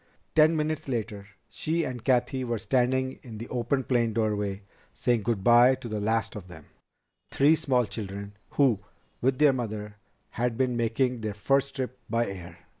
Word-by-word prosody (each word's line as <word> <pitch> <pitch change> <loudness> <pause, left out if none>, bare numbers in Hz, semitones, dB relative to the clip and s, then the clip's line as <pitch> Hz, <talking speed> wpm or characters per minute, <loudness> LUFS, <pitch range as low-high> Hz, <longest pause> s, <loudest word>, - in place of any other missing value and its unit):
Ten 155 +1 +5
minutes 155 -1 -2
later 105 -5 -3 0.2
she 165 +2 -1
and 125 -5 -5
Cathy 130 0 +1
were 120 -2 -1
standing 130 +3 0
in 115 -4 -9
the 115 +3 -7
open 130 +2 0
plane 120 -3 +1
doorway 105 -3 -1 0.3
saying 120 -2 +1
good 105 -2 -1
by 120 +3 +6
to 130 -2 -9
the 110 -2 -3
last 110 +3 0
of 100 -4 -8
them, 80 -4 -12 0.6
three 145 +3 +4
small 130 -6 +2
children, 100 -1 -6 0.2
who, 130 -8 +4 0.4
with 130 +1 +2
their 150 -1 +5
mother, 105 -4 -5 0.3
had 120 -1 -1
been 130 -2 +1
making 120 +1 0
their 105 -2 -3
first 135 +6 +1
trip 130 -1 -4
by 115 +2 +1
air. 90 -4 -8
120 Hz, 170 wpm, -27 LUFS, 105-130 Hz, 0.6 s, by